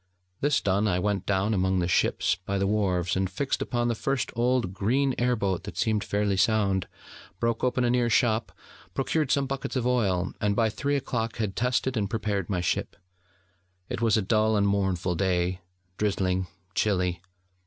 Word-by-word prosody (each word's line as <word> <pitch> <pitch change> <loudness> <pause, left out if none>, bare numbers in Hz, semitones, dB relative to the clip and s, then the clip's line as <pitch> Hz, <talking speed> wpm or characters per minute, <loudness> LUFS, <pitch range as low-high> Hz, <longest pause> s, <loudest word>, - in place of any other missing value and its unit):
This 145 0 +2
done, 100 +2 +1
I 90 -3 +1
went 100 0 -1
down 100 +2 +1
among 95 -1 +1
the 90 -1 +1
ships 90 - +2
by 95 +1 -4
the 100 - +1
wharves, 95 -4 +1
and 95 0 0
fixed 140 +4 -2
upon 120 -1 0
the 120 - +1
first 135 +3 -1
old 120 -4 +1
green 130 +8 +1
air 125 0 +2
boat 95 -5 -1
that - - -8
seemed 110 -2 +1
fairly 100 -1 0
sound, 100 -3 +2 0.5
broke 115 -1 0
open 125 0 +1
a 120 - +2
near 120 -1 +2
shop, 110 0 +2 0.4
procured 140 +1 0
some 140 0 +2
buckets 135 0 -4
of 125 -2 0
oil, 100 -8 +1
and 105 -1 +1
by 115 -1 +3
three 140 +6 -1
o'clock 115 -4 -2
had 105 -4 -2
tested 125 +1 0
and 100 -3 -1
prepared 105 -5 -2
my 90 -3 0
ship. 85 - -1 0.9
It - - -4
was 115 -2 +3
a 110 - +1
dull 110 +1 +2
and 100 0 +3
mournful 95 -3 0
day, 90 0 0 0.4
drizzling, 95 -3 0 0.3
chilly. 90 -5 0
105 Hz, 180 wpm, -27 LUFS, 95-120 Hz, 0.9 s, by